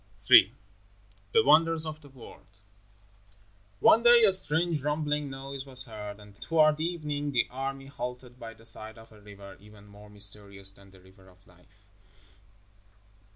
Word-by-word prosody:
III 100 +7 +6 0.8
THE 150 - +2
WONDERS 160 +2 +2
OF 155 0 -9
THE 145 - -18
WORLD 100 -6 -18 1.2
One 225 - +3
day 240 0 +4
a 200 -3 +4
strange 165 -3 +5
rumbling 150 0 -4
noise 135 0 -9
was 130 -1 +4
heard, 105 -3 -11
and 105 -1 -19
toward 155 -2 0
evening 150 -4 -5
the 125 - -1
army 135 +1 -7
halted 125 -2 -10
by 115 -1 -11
the 115 - -14
side 110 -1 0
of 115 0 -18
a 105 -1 -20
river 100 -1 -15
even 105 0 -19
more 105 +1 -18
mysterious 100 -1 -1
than 100 0 -20
the 95 -1 -21
River 95 +1 -22
of 90 +1 -26
Life. 90 +3 -27
125 Hz, 155 wpm, -26 LUFS, 105-150 Hz, 1.2 s, III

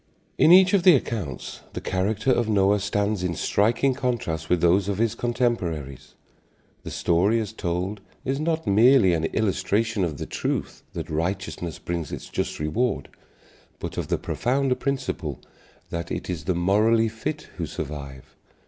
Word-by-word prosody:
In 160 - +6
each 190 +2 +7
of 200 - +5
the 180 -2 +7
accounts 100 - -4
the - - -3
character 105 +6 0
of 120 -3 +1
Noah 100 0 +3
stands 100 0 0
in 90 -2 -1
striking 115 - +2
contrast 115 - -2
with 90 - +3
those 90 +4 +3
of 100 - -1
his 115 0 +1
contemporaries. 95 - -2 0.7
The - - -7
story 95 +7 +2
as 110 -1 -4
told 95 +1 -3 0.2
is 135 +2 -1
not 160 +1 -1
merely 110 -1 +5
an 80 -1 0
illustration 105 +2 0
of 80 -5 -2
the - - -4
truth - - -3
that 80 -1 -5
righteousness 85 +1 -3
brings 85 -2 -4
its - - -7
just - - -3
reward, 110 +12 -1 0.7
but - - -6
of - - -3
the - - 0
profounder 135 +1 0
principle 135 0 -3 0.5
that 85 0 -4
it - - -4
is 80 -4 -5
the 90 - 0
morally 105 +6 +3
fit 115 +8 -5
who 85 -3 -3
survive. 70 -3 -7
100 Hz, 155 wpm, -25 LUFS, 85-120 Hz, 0.7 s, each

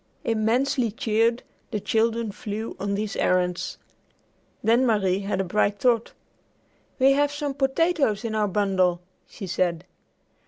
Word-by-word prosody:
Immensely 230 +3 +1
cheered, 225 +2 +1 0.3
the 215 - -2
children 225 +1 0
flew 215 +1 -5
on 200 0 -1
these 210 0 -3
errands. 180 -1 0 0.9
Then 230 +4 +4
Marie 200 -6 +2
had 200 -1 -2
a - - +2
bright 205 +2 +1
thought. 235 0 +1 0.8
"We 265 0 +5
have 290 +1 +2
some 290 -1 -3
potatoes 275 - +1
in 225 - -2
our 215 -1 +1
bundle," 185 -3 +1 0.3
she 205 - -8
said. 175 -1 -1
215 Hz, 130 wpm, -25 LUFS, 200-240 Hz, 0.9 s, We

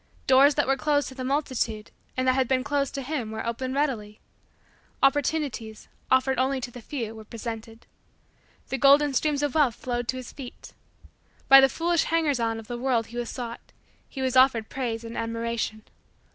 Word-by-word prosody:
Doors 270 +2 +6
that 290 - +2
were 270 0 +1
closed 290 0 +1
to - - -10
the 260 -1 -6
multitude, 255 -6 -2 0.3
and 255 0 0
that 255 - +5
had 260 -1 +1
been 255 0 +1
closed 280 0 -1
to 275 - -3
him, 260 -5 -3
were 220 0 -5
opened 255 +3 -3
readily. 225 -8 -2 0.8
Opportunities, 275 -5 0 0.2
offered 260 0 +3
only 265 +1 +1
to 245 -1 -6
the 245 - -10
few, 230 -4 -5
were 220 -1 -10
presented. 225 0 -8 0.8
The 270 - -2
golden 280 +2 +5
stream 300 +3 +1
of 290 - 0
wealth 285 -7 +3
flowed 245 -1 -3
to 255 - -1
his 255 -2 -8
feet. 260 -4 -10 0.7
By 270 0 +10
the 270 - +5
foolish 335 +4 +1
hangers 310 -5 +1
on 225 -1 0
of 225 - -8
the 240 +2 -6
world 245 -3 +1
he - - -6
was 240 -1 -3
sought 235 -2 -7 0.4
he 265 - -5
was 260 -1 0
offered 255 -4 +4
praise 235 -4 -3
and 230 0 -8
admiration. 230 -1 -3
255 Hz, 185 wpm, -26 LUFS, 230-275 Hz, 0.8 s, By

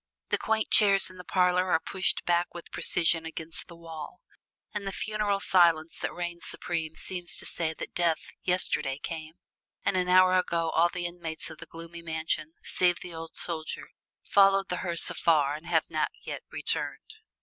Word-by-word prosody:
The - - +1
quaint 220 0 0
chairs 195 -3 +6
in 185 - -14
the 180 - -9
parlors 180 0 +3
are 165 - +4
pushed 185 +2 -1
back 175 0 +1
with 170 - -9
precision 165 -1 +2
against 160 0 -7
the 170 - -12
wall, 165 -3 -9 0.5
and 205 -2 -4
the - - -1
funereal 210 0 -1
silence 170 -4 +3
that - - -2
reigns 175 -1 -5
supreme 160 -2 -3
seems 180 -2 0
to - - -5
say 160 -1 +2
that - - -7
death 170 -2 +2 0.2
yesterday 180 -7 0
came, 160 0 -6 0.5
and - - +2
an 180 -1 +1
hour 185 0 +6
ago 170 -2 0
all 170 +2 +4
the 175 0 -4
inmates 170 -2 -5
of 160 - -11
the - - -10
gloomy 165 +1 -9
mansion, 160 -1 -2
save 180 -1 +2
the 180 - -8
old 165 0 -8
soldier, 160 -2 -3 0.3
followed 195 -1 +4
the 180 - -1
hearse 170 -2 0
afar 150 -4 +3
and 155 +3 -8
have 165 -2 +2
not 155 -2 0 0.2
yet - - -5
returned. - - -3
170 Hz, 180 wpm, -28 LUFS, 160-180 Hz, 0.5 s, chairs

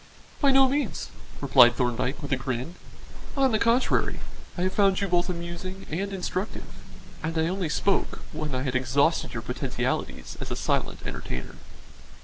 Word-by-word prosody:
"By 280 - +5
no 270 0 +7
means," 260 - -1 0.3
replied 125 -3 +7
Thorndyke, 125 +4 -1
with 140 - -5
a - - +4
grin. 130 +4 -3 0.6
"On 270 -2 +4
the 215 - +2
contrary, 235 +4 +2 0.4
I 175 - 0
have 185 0 0
found 195 -2 +4
you 200 - 0
both 175 0 +2
amusing 180 +2 -5
and 195 +5 -2
instructive, 190 +1 -3 0.6
and 165 0 -2
I 160 0 +2
only 185 -2 -1
spoke 195 +5 0
when 150 -4 -3
I 130 - -1
had 135 -3 -1
exhausted 130 +2 +2
your - - -3
potentialities - - -3
as - - -4
a - - -2
silent - - -1
entertainer." 65 +1 -5
170 Hz, 160 wpm, -27 LUFS, 135-195 Hz, 0.6 s, no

